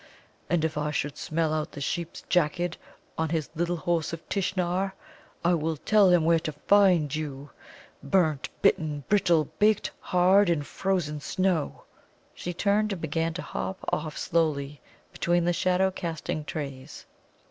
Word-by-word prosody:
And 160 Hz, -2 st, +2 dB
if 155 Hz, -1 st, -2 dB
I 150 Hz, 0 st, -1 dB
should 145 Hz, -1 st, -2 dB
smell 160 Hz, 0 st, -1 dB
out 155 Hz, -1 st, -2 dB
the -, -, -7 dB
Sheep's 170 Hz, +4 st, -3 dB
jacket 175 Hz, 0 st, +1 dB, 0.4 s
on 160 Hz, -1 st, 0 dB
his 160 Hz, -2 st, -2 dB
Little 175 Hz, +2 st, -1 dB
Horse 165 Hz, -1 st, -1 dB
of 165 Hz, -, -7 dB
Tishnar, 190 Hz, 0 st, 0 dB, 0.5 s
I 175 Hz, -, +4 dB
will 160 Hz, -1 st, -1 dB
tell 210 Hz, +4 st, +4 dB
him 175 Hz, -3 st, +4 dB
where 165 Hz, 0 st, +4 dB
to 155 Hz, -, -4 dB
find 180 Hz, -3 st, +3 dB
you 145 Hz, -2 st, -5 dB, 0.5 s
burnt, 155 Hz, -1 st, +1 dB
bitten, 150 Hz, -2 st, +2 dB
brittle, 175 Hz, -6 st, +3 dB
baked 210 Hz, 0 st, +3 dB
hard 185 Hz, +2 st, +4 dB
in 160 Hz, -4 st, +1 dB
frozen 170 Hz, -3 st, -2 dB
snow!" 180 Hz, +1 st, -1 dB, 0.5 s
She 175 Hz, -, -5 dB
turned 205 Hz, +4 st, +1 dB
and 195 Hz, -, -3 dB
began 165 Hz, +1 st, -1 dB
to 180 Hz, -, -4 dB
hop 190 Hz, -, -4 dB, 0.2 s
off 155 Hz, 0 st, -2 dB
slowly 150 Hz, -3 st, 0 dB, 0.3 s
between 175 Hz, 0 st, +1 dB
the 175 Hz, -, +2 dB
shadow 185 Hz, +2 st, +2 dB
casting 165 Hz, -4 st, -4 dB
trees. 140 Hz, -2 st, -6 dB
165 Hz, 150 wpm, -27 LUFS, 155-180 Hz, 0.5 s, I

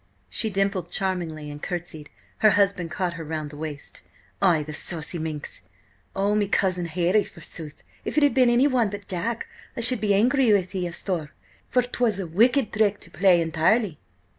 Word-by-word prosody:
She 220 Hz, -, -1 dB
dimpled 195 Hz, -3 st, -1 dB
charmingly 175 Hz, -6 st, -2 dB
and 145 Hz, 0 st, -9 dB
curtsied. 170 Hz, -4 st, -5 dB, 0.3 s
Her 215 Hz, -, +6 dB
husband 200 Hz, -4 st, +2 dB
caught 180 Hz, +1 st, -2 dB
her 165 Hz, -1 st, -6 dB
round 155 Hz, -1 st, -4 dB
the -, -, -10 dB
waist. 150 Hz, -2 st, -7 dB, 0.4 s
"Ay, 165 Hz, -4 st, +4 dB
the 150 Hz, +1 st, -7 dB
saucy 165 Hz, +2 st, -3 dB
minx! 155 Hz, -2 st, -5 dB, 0.5 s
Oh, 200 Hz, +2 st, +1 dB
me 210 Hz, -1 st, +2 dB
cousin 185 Hz, -3 st, +1 dB
Harry, 180 Hz, +5 st, +2 dB
forsooth! 155 Hz, -3 st, -10 dB, 0.2 s
If -, -, -4 dB
it 300 Hz, -, +5 dB
had 290 Hz, -, +4 dB
been 255 Hz, -2 st, +5 dB
anyone 245 Hz, -2 st, +3 dB
but 205 Hz, 0 st, -8 dB
Jack 215 Hz, +5 st, -2 dB, 0.3 s
I -, -, -1 dB
should 245 Hz, -1 st, +2 dB
be 205 Hz, -2 st, +3 dB
angry 245 Hz, +3 st, +4 dB
with 185 Hz, -2 st, +1 dB
ye, 180 Hz, -2 st, -1 dB
asthore, 170 Hz, -2 st, -3 dB, 0.4 s
for 250 Hz, -, +3 dB
'twas 245 Hz, -4 st, 0 dB
a 190 Hz, -, -2 dB
wicked 235 Hz, -, +3 dB
thrick 210 Hz, -1 st, +2 dB
to -, -, -14 dB
play 180 Hz, -3 st, +4 dB
entirely!" 165 Hz, +3 st, +1 dB
185 Hz, 180 wpm, -25 LUFS, 165-215 Hz, 0.5 s, Her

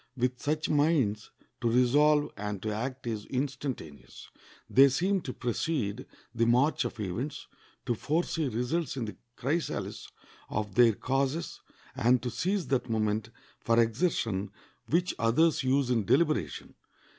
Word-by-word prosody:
With 125 Hz, 0 st, -1 dB
such 155 Hz, +2 st, -1 dB
minds 145 Hz, -9 st, +1 dB, 0.3 s
to 120 Hz, -, +2 dB
resolve 145 Hz, +5 st, +4 dB
and 105 Hz, -1 st, -4 dB
to 110 Hz, -, -1 dB
act 125 Hz, +4 st, -4 dB
is 110 Hz, -3 st, -4 dB
instantaneous. 130 Hz, -, -5 dB, 0.4 s
They 135 Hz, +2 st, +6 dB
seem 185 Hz, +8 st, +1 dB
to 130 Hz, -, -5 dB
precede 120 Hz, -3 st, -2 dB, 0.3 s
the 115 Hz, -1 st, +1 dB
march 125 Hz, +6 st, +3 dB
of 115 Hz, -, -5 dB
events, 115 Hz, +10 st, -4 dB, 0.4 s
to 120 Hz, -, +1 dB
foresee 160 Hz, +5 st, -1 dB
results 125 Hz, +6 st, -2 dB
in 120 Hz, -, -2 dB
the 105 Hz, -, -7 dB, 0.2 s
chrysalis 150 Hz, +6 st, -3 dB, 0.4 s
of 105 Hz, -2 st, -3 dB
their 120 Hz, +1 st, +6 dB
causes, 135 Hz, +7 st, -2 dB, 0.3 s
and 125 Hz, +2 st, +3 dB
to 125 Hz, -, -2 dB
seize 190 Hz, -, -1 dB
that 130 Hz, -3 st, 0 dB
moment 110 Hz, -1 st, 0 dB, 0.3 s
for 115 Hz, 0 st, +2 dB
exertion 115 Hz, -, 0 dB, 0.4 s
which 175 Hz, +3 st, +1 dB
others 140 Hz, +9 st, +3 dB
use 130 Hz, 0 st, +1 dB
in 115 Hz, -3 st, +2 dB
deliberation. 155 Hz, -, +1 dB
125 Hz, 135 wpm, -29 LUFS, 115-150 Hz, 0.4 s, They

